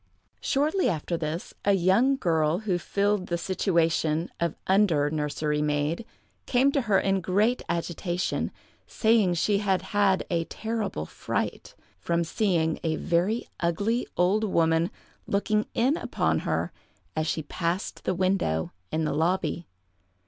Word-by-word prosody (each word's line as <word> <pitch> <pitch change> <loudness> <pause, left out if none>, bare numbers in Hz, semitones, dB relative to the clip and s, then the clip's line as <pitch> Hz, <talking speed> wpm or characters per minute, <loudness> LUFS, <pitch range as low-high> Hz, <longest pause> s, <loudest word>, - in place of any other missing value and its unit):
Shortly 310 +7 +1
after 170 0 -2
this, 160 +1 -4
a 200 - +4
young 195 +9 +3
girl 160 - +1
who 190 -5 0
filled 200 0 0
the 170 - -1
situation 165 -3 +1
of 170 -2 0
under 175 -7 +3
nursery 150 0 -1
maid, 150 +7 0 0.4
came 265 +3 +3
to 280 - +1
her 210 -5 +3
in 195 -1 +1
great 210 +8 +2
agitation, 175 +1 -1 0.4
saying 220 -4 +3
that 175 - 0
she 200 +4 +2
had 190 -3 +1
had 200 -2 +3
a 165 -1 +1
terrible 220 - -3
fright, - - -4 0.2
from 170 0 0
seeing 165 -3 0
a 160 -1 0
very 180 +9 0
ugly 200 +8 0
old 190 +5 +3
woman 165 -3 +2 0.4
looking 210 +1 +1
in 265 +7 +2
upon - - 0
her - - 0 0.4
as 155 0 0
she 160 - -1
passed 170 +5 -3
the 185 - 0
window 185 - 0 0.2
in 160 0 0
the - - 0
lobby. 170 +2 0
180 Hz, 140 wpm, -27 LUFS, 165-205 Hz, 0.4 s, a